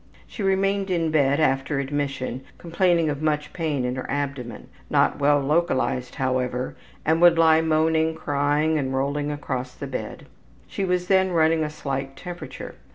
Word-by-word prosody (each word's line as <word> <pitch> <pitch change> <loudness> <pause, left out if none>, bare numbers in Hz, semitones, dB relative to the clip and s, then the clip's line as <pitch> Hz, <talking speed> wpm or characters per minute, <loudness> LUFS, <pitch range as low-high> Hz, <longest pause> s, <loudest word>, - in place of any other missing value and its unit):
She - - -9
remained 195 0 +1
in 165 -3 0
bed 140 -2 +3
after 135 -1 +1
admission, 140 -2 -3 0.2
complaining 170 -1 +1
of 145 0 -5
much 150 -1 -1
pain 150 -7 -1
in 125 +1 -2
her 130 - -5
abdomen, 135 -5 -4 0.2
not - - +2
well 145 0 +4
localized 135 -4 0
however, 130 -2 -1 0.3
and 160 +2 +2
would 175 -1 +7
lie 160 -1 +5
moaning, 160 0 +2
crying, 145 +2 +1
and 130 -1 -2
rolling 140 +2 -1
across 130 -3 -4
the - - -6
bed. 135 -2 -6 0.4
She 195 - -4
was 180 -1 0
then 190 -1 +3
running 160 -1 +3
a 150 - -2
slight 135 -2 -4
temperature. 175 -1 -8
150 Hz, 160 wpm, -24 LUFS, 135-165 Hz, 0.4 s, would